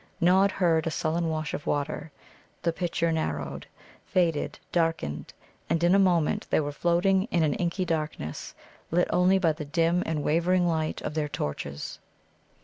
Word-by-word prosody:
Nod 190 +3 +5
heard 165 -4 +2
a - - +2
sullen 165 +2 -1
wash 155 -1 -3
of - - -5
water, 145 +1 -2 0.5
the 170 - +1
picture 170 -1 0
narrowed, 75 - -3 0.4
faded, 170 -5 0
darkened, 165 - -1 0.4
and 165 0 +1
in 175 +1 +5
a 200 - +5
moment 175 -5 +2
they - - +3
were 145 -1 -2
floating 175 +5 +2
in 175 -7 +1
an 150 -2 +2
inky 180 +2 -1
darkness, 155 - -4 0.3
lit 175 +2 +2
only 180 +2 +4
by 170 -4 +3
the 155 0 -6
dim 165 +4 +1
and 155 -2 -1
wavering 175 +3 +2
light 160 -2 -1
of 150 - -3
the 150 -1 -1
torches. 70 - -5
165 Hz, 160 wpm, -27 LUFS, 150-175 Hz, 0.5 s, Nod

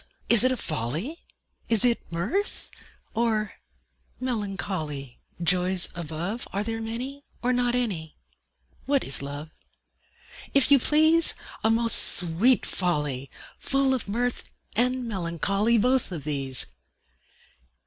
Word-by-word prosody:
Is 235 -1 +8
it 255 - +5
a 255 - -1
folly, 160 - -3 0.5
Is 225 0 +4
it 235 -7 +1
mirth, 215 - -2 0.4
or 220 -2 0 0.7
melancholy? 190 - -4 0.2
Joys 180 +1 +2
above, 170 +7 -4
Are 200 +1 -2
there 225 +1 -4
many, 250 +6 -5 0.2
or 250 +1 +2
not 245 0 +1
any? 185 -11 -2 0.7
What 280 -1 +2
is 135 - -2
Love? 145 +3 -7 1.0
If 275 0 +4
you 280 - +8
please, 315 +5 +4 0.3
A 220 - +3
most 230 +1 +5 0.2
sweet 180 +9 +3
folly! 150 -7 -1 0.3
Full 275 -1 +2
of 255 - -2
mirth 245 +3 -2 0.3
and 250 +2 +1
melancholy: 200 +3 0
Both 250 +1 +2
of 160 -5 -5
these! 135 -3 +1
215 Hz, 120 wpm, -26 LUFS, 165-250 Hz, 1.0 s, Is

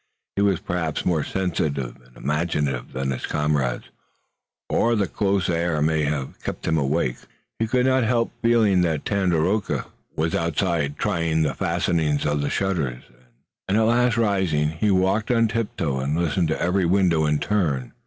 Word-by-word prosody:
He 100 - 0
was 100 -4 +2
perhaps 85 -3 -3
more 80 -4 +1
sensitive 75 -9 -2
and - - -21
imaginative 75 -3 -1
than 65 +1 -2
his 65 - -4
comrades, 75 -4 0 0.8
or 115 +1 +2
the 105 -2 +1
close 100 -2 0
air 85 -2 0
may 80 0 +1
have 70 -2 -3
kept - - -5
him 80 - +1
awake. 70 -3 0 0.4
He 115 - +1
could 125 +2 +2
not 130 -1 +3
help 115 0 +1
feeling 110 -5 +4
that 80 -4 0
Tandakora 95 0 0 0.3
was 80 +1 -1
outside 85 -3 0
trying 85 -5 0
the 75 - 0
fastenings 80 -4 0
of 75 0 0
the 70 - -1
shutters, 80 -11 -1 0.6
and 95 +2 +2
at - - +4
last 120 +1 +3
rising, 95 -9 +1
he 80 +7 -1
walked 95 +3 +2
on 115 -2 +3
tiptoe 100 -11 -2
and 70 +4 -1
listened 85 0 +1
at 80 - 0
every 90 +1 +1
window 85 -4 +3
in 75 0 +2
turn. 75 -11 -1
85 Hz, 165 wpm, -23 LUFS, 75-100 Hz, 0.8 s, feeling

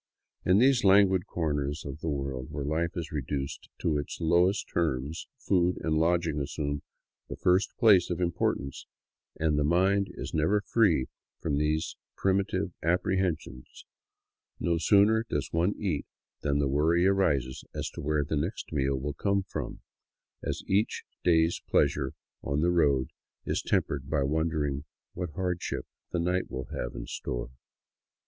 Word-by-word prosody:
In 90 +1 +4
these 130 +2 +4
languid 95 -2 +5
corners 75 -3 -2
of 70 +1 -6
the 80 - -3
world 70 -3 -3
where 75 -1 -4
life 80 +4 -1
is 80 -3 -4
reduced 70 -1 -4
to 75 -3 +1
its 70 - -5
lowest 85 +5 +3
terms 75 -1 -1
food 90 -6 +1
and 80 -1 +1
lodging 85 -2 +2
assume 70 0 -2 0.5
the - - -4
first 90 +2 +2
place 100 -6 +6
of 90 - -2
importance, 75 -6 -1 0.5
and 75 -2 +2
the - - +2
mind 95 +5 +3
is - - -6
never 80 +7 +2
free 100 - +2 0.3
from 70 - 0
these 75 +1 0 0.2
primitive 95 0 +1
apprehensions; 85 -6 -1 0.7
no 85 -1 +1
sooner 105 +6 +5
does 75 - -1
one 85 +5 +2
eat 90 -8 -2 0.3
than 70 -1 +1
the 70 -1 +2
worry 80 +6 +3
arises 75 -10 +1
as - - -2
to - - -7
wdiere 75 -1 0
the 80 - -1
next 80 +5 -3
meal 70 -2 +1
will 75 +2 -3
come 100 +3 0
from, 80 -8 -6 0.6
as - - -3
each 100 +3 +1 0.2
day's 80 -1 +3
pleasure 70 -2 +2 0.3
on 70 +1 -1
the 85 +2 +3
road 70 -7 +3 0.4
is - - 0
tempered 70 -1 -1
by 75 -2 +1
wondering 75 -1 0 0.3
what 90 -1 -4
hardship 90 0 -2 0.2
the - - -2
night 90 +2 0
will 65 -1 -4
have - - -4
in - - -5
store. - - -4
80 Hz, 150 wpm, -29 LUFS, 70-90 Hz, 0.7 s, place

